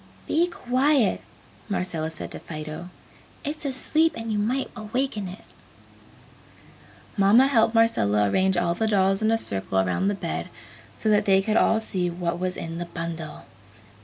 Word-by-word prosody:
"Be 335 +3 +2
quiet!" 260 - +1 0.5
Marcella 175 -5 -2
said 160 - -8
to - - -4
Fido, 155 +2 -7 0.6
"It's 300 +1 -4
asleep 310 +4 +1
and 225 0 -4
you 210 - 0
might 250 +6 -1
awaken 220 -1 -2
it!" 185 +3 -10 1.7
Mamma 205 +6 +6
helped 230 -4 +3
Marcella 105 - +3
arrange 190 - +2
all 175 -1 +1
the 220 +6 -1
dolls 195 -1 +2
in 215 - +2
a 225 - +3
circle 95 - -2
around 95 - +1
the 205 - +1
bed 85 - -4 0.5
so - - -3
that 210 0 +3
they 195 -1 +5
could 215 +3 0
all 225 - +4
see 185 -5 -2
what 175 0 -3
was 185 0 -2
in 165 0 -5
the 175 - -3
bundle. 165 -2 -6
195 Hz, 160 wpm, -25 LUFS, 170-225 Hz, 1.7 s, Mamma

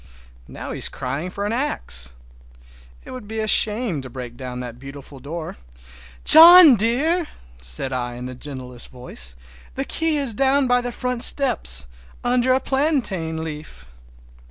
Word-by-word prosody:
Now - - -8
he's - - -1
crying 140 +8 -5
for 200 +2 -5
an 210 - -2
axe. 65 - -3 0.9
It - - -10
would 255 -5 -9
be 220 +1 -5
a 215 - -2
shame 210 - +2
to 130 - -10
break 125 -1 -9
down 125 -1 -7
that 120 -1 -9
beautiful 140 0 -11
door! 155 +4 -7 0.7
"John 335 -1 +10
dear!" 285 - +1 0.3
said 60 - -5
I 120 -1 -4
in 125 +1 -8
the 125 - -7
gentlest 125 -2 -8
voice, 65 - -6 0.4
"the - - -3
key 325 -2 -1
is 275 -5 0
down 270 +4 +2
by 245 0 +2
the 245 0 -5
front 250 0 -1
steps, 235 - +1 0.4
under 250 +1 +1
a 260 - +3
plantain 240 - -2
leaf!" 155 -1 -9
185 Hz, 155 wpm, -21 LUFS, -, 0.9 s, John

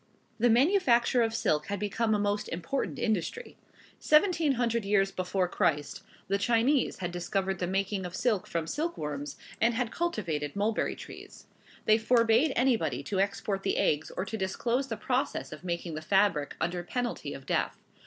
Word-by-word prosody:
The 240 +2 +4
manufacture 250 - +4
of 225 -1 +1
silk 175 -9 +1
had 200 -1 -3
become 215 +2 0
a - - 0
most 205 0 -1
important 175 +11 -3
industry. 220 - -2 0.4
Seventeen 310 -2 +4
hundred 235 -2 0
years 195 -1 +2
before 185 0 -1
Christ 150 -4 0 0.3
the 200 +1 +1
Chinese 240 +6 +2
had 175 -2 -4
discovered 190 +2 -2
the 180 - -1
making 195 +1 -1
of 180 0 -6
silk 220 -5 0
from 165 -1 -2
silk 325 - -2
worms, 145 -1 -5 0.2
and 230 +1 +3
had 245 -1 -1
cultivated 170 - -2
mulberry 215 +2 0
trees. - - -11 0.4
They 215 +1 +5
forbade 230 +4 +4
anybody 220 - +1
to 190 +6 -2
export 195 0 -1
the - - 0
eggs 150 +1 +1
or 185 - -1
to 220 +3 -4
disclose 235 +7 -1
the 225 -4 -4
process 250 +4 -1
of - - -9
making 170 -1 -3
the 155 - -4
fabric, 190 -5 +2
under 175 +1 -1
penalty 245 +7 -3
of - - -11
death. - - 0
205 Hz, 170 wpm, -29 LUFS, 180-240 Hz, 0.4 s, They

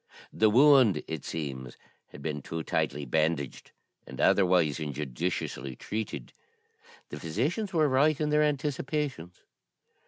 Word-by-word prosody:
The 110 - +4
wound, 125 - +5
it 80 -3 -5
seems, 65 -6 -5 0.3
had 70 - -13
been 75 -2 -3
too 80 +3 -5
tightly 70 0 -1
bandaged, 75 0 -1 0.4
and - - -10
otherwise 90 -6 +3
injudiciously 70 -2 -4
treated. 105 - -5 0.8
The 75 - -7
physicians 140 - -2
were 160 -4 +3
right 140 +3 +3
in 150 -1 0
their 150 0 +4
anticipations. 145 - -2
90 Hz, 120 wpm, -28 LUFS, -, 0.8 s, wound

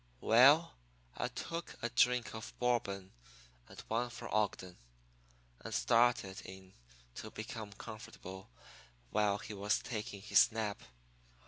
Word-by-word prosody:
"Well, 140 +9 +6 0.4
I 125 - -1
took 165 +7 -6
a 120 - 0
drink 125 0 +3
of 110 0 -8
Bourbon 100 -6 0 0.6
and - - -12
one 120 +2 -1
for 120 - -8
Ogden, 100 -4 -1 0.8
and - - -8
started 115 -5 +3
in 95 0 -11 0.4
to - - -7
be - - -6
comfortable 100 - -8 0.6
while 105 -1 +2
he 110 - -8
was 105 +1 +1
taking 105 -3 -5
his 110 - +5
nap. 110 -2 -3
110 Hz, 120 wpm, -35 LUFS, 100-120 Hz, 0.8 s, Well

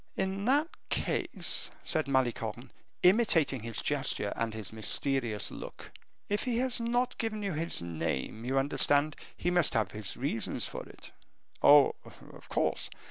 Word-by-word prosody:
"In 195 +1 -1
that 285 +6 +3 0.2
case," - - 0
said 155 -2 +1
Malicorne, 120 -2 -1 0.3
imitating 180 - +4
his 115 -1 -3
gesture 140 -8 0
and 115 -1 -1
his 110 -1 -6
mysterious 110 +1 -1
look, - - -9 0.4
"if 205 +1 -1
he 245 -2 0
has 255 0 0
not 245 +2 0
given 215 -2 -2
you 195 -3 -1
his 160 - +1
name, 85 - -3
you 130 +2 -1
understand, 145 +2 +2 0.2
he 175 - 0
must 175 -4 +3
have 110 -4 +1
his 105 -2 -4
reasons 125 -4 -1
for - - -6
it." - - -13 0.5
"Oh, 145 -1 +7
of - - -15
course." - - 0
145 Hz, 145 wpm, -30 LUFS, -, 0.5 s, Oh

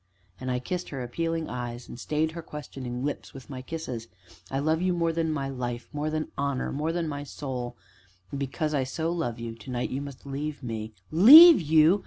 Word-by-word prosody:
And 130 - -4
I 125 - +1
kissed 175 +8 -4
her 135 -3 -4
appealing 165 +6 -2
eyes, 120 -1 -5
and 120 - -9
stayed 155 +3 0
her 170 +1 -6
questioning 135 -5 -6
lips 145 - -4
with 135 +1 -10
my 130 -1 -6
kisses. 130 -6 -5 0.4
"I 135 - -2
love 155 +4 +1
you 185 0 +2
more 165 -1 +1
than 165 -1 0
my 140 -3 -2
life 120 -3 -4
more 150 +1 -1
than 155 0 -3
honor 140 -2 -1
more 150 +3 -1
than 170 -1 -1
my 145 -1 -4
soul; 125 -4 -5 0.5
and, 140 - -4
because 150 +3 -2
I 140 -3 +1
so 160 +6 -2
love 140 -9 -2
you 115 -1 -5
to 115 +1 -12
night 125 -1 -2
you 135 - -2
must 140 -2 -9
leave 145 +1 -4
me 110 -2 -4
" - - -33 0.2
"Leave 325 - +12
you? 160 +4 +5
140 Hz, 215 wpm, -27 LUFS, 125-160 Hz, 0.5 s, Leave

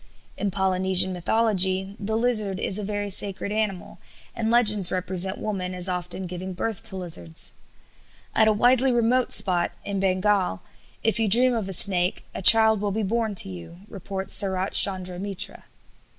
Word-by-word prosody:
In 205 - -3
Polynesian 190 -1 +1
mythology 190 0 0
the 220 +1 -3
lizard 215 -5 0
is 195 - -3
a - - -5
very 205 0 -4
sacred 200 +1 -1
animal, 210 -4 -4 0.4
and 225 -1 -3
legends 210 -6 +2
represent 185 +1 +1
women 185 -4 -5
as 180 0 0
often 180 +1 -5
giving 180 +1 -7
birth 220 +4 -5
to 205 - -6
lizards. 90 - -4 0.8
At 220 - +3
a - - +4
widely 250 +4 +2
remote 240 +1 0
spot, 175 -3 +1
in 200 -1 -4
Bengal, 190 - -1 0.4
if 225 +1 0
you 225 - 0
dream 245 +5 +3
of 220 -5 -4
a - - -5
snake 180 0 +3
a - - -7
child 220 +1 +7
will 205 - -2
be 215 +2 -3
born 220 +1 -2
to 140 - +3
you, 90 - -11
reports 195 0 -6
Sarat 190 -1 +1
Chandra 185 -2 +4
Mitra. 195 -1 -4
195 Hz, 165 wpm, -23 LUFS, 185-220 Hz, 0.8 s, child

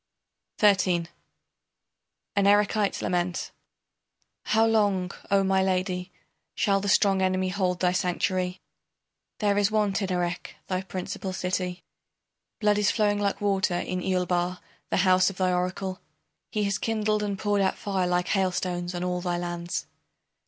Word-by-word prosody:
XIII. 185 -5 +3 1.3
AN 200 0 +3
ERECHITE'S 205 0 +2
LAMENT 175 0 -1 0.9
How 220 +1 +3
long, 205 -5 +2 0.2
O 195 0 +4
my 190 0 +2
Lady, 185 -1 -1 0.4
shall 195 -1 +2
the 200 - -2
strong 195 -1 +4
enemy 185 0 +1
hold 185 -2 -1
thy 180 -1 +3
sanctuary? 180 0 -1 0.8
There 205 -2 +2
is 205 0 +3
want 210 -2 +1
in 195 -1 -2
Erech, 175 -1 -2
thy 185 -1 -2
principal 190 0 -5
city; 180 0 -2 0.8
Blood 210 -1 +3
is 205 - +3
flowing 205 -2 +1
like 200 0 -1
water 195 -3 +1
in 185 +1 -3
Eulbar, 180 -1 0 0.3
the - - 0
house 185 0 +5
of 195 - -9
thy 185 -1 +1
oracle; 185 +1 -2 0.5
He 210 - -1
has 200 -1 0
kindled 215 -1 0
and 205 -1 -2
poured 205 0 +1
out 190 - +1
fire 195 -3 -1
like 180 0 0
hailstones 180 -2 -1
on 175 - -3
all 180 0 -1
thy 175 -1 -1
lands. 175 0 -3
185 Hz, 145 wpm, -26 LUFS, 180-200 Hz, 1.3 s, house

